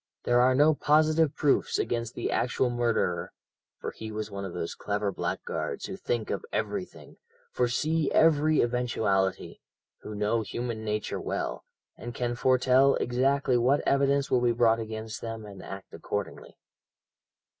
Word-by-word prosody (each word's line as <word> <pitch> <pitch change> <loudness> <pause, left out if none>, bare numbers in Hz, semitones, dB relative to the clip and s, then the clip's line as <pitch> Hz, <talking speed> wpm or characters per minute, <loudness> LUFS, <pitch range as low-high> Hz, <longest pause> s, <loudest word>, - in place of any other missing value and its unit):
There 120 0 +3
are 130 +1 +4
no 150 +3 +5
positive 155 +1 +3
proofs 145 -2 +2
against 115 0 -2
the - - -2
actual 125 0 +1
murderer, 120 -7 0 0.5
for - - -4
he 110 0 -8
was 105 0 -5
one 100 0 -5
of 95 - -5
those 85 -1 -4
clever 105 0 -2
blackguards - - -3
who - - -5
think 115 -3 -2
of - - -3
everything, - - -4 0.3
foresee 145 +6 0
every 155 -1 +4
eventuality, 110 -6 0 0.4
who 105 - -8
know 105 +2 +1
human 115 0 -4
nature 105 0 -2
well, - - -3 0.3
and 120 0 -7
can 120 -1 -1
foretell 130 +2 +4
exactly 130 +1 +1
what 130 +4 +2
evidence 140 0 +2
will 125 - +3
be 120 -1 +3
brought 115 -1 +3
against 110 0 -6
them, 115 -1 -6
and 100 -2 -10
act 95 0 -9
accordingly. 100 -1 -5
120 Hz, 145 wpm, -28 LUFS, 110-135 Hz, 0.5 s, no